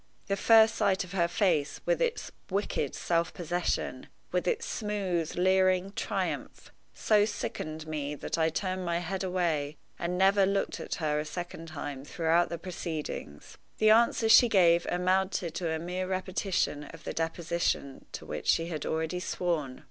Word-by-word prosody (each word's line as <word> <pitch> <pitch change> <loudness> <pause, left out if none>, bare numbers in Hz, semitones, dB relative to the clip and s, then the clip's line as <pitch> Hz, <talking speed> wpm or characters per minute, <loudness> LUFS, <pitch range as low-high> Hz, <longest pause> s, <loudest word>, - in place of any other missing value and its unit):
The 195 - 0
first 225 +2 +6
sight 200 -4 +1
of 180 - -11
her 175 -3 +2
face, 165 -6 +1
with - - +1
its 485 -1 -1 0.2
wicked 195 -7 -1
self 170 -1 0
possession, 175 +1 -2 0.2
with - - 0
its 465 -1 0
smooth 195 -7 -2
leering 185 +1 +3
triumph, - - -3 0.2
so 210 -2 +3
sickened 155 -6 -4
me 150 -2 -3
that - - -3
I 160 -1 +2
turned 185 +3 -2
my 170 -1 0
head 185 +3 -3
away 165 -5 -1 0.2
and 175 +1 -2
never 195 +1 +5
looked 200 0 -1
at - - -4
her 150 -2 0
a - - -1
second 170 0 -6
time 145 -3 -6
throughout 165 +3 +1
the 170 - -4
proceedings. 160 - -6 0.2
The 215 0 +5
answers 225 0 +4
she 235 +1 +8
gave 175 -4 +4
amounted 185 -1 0
to 175 -3 -2
a 160 - 0
mere 180 +3 -3
repetition 185 -5 -1
of 165 +2 -12
the - - -4
deposition 165 -4 -2
to - - -6
which - - -6
she 165 +1 +2
had 155 -4 -4
already 160 +3 -1
sworn. 165 -7 -2
175 Hz, 165 wpm, -29 LUFS, 160-190 Hz, 0.2 s, she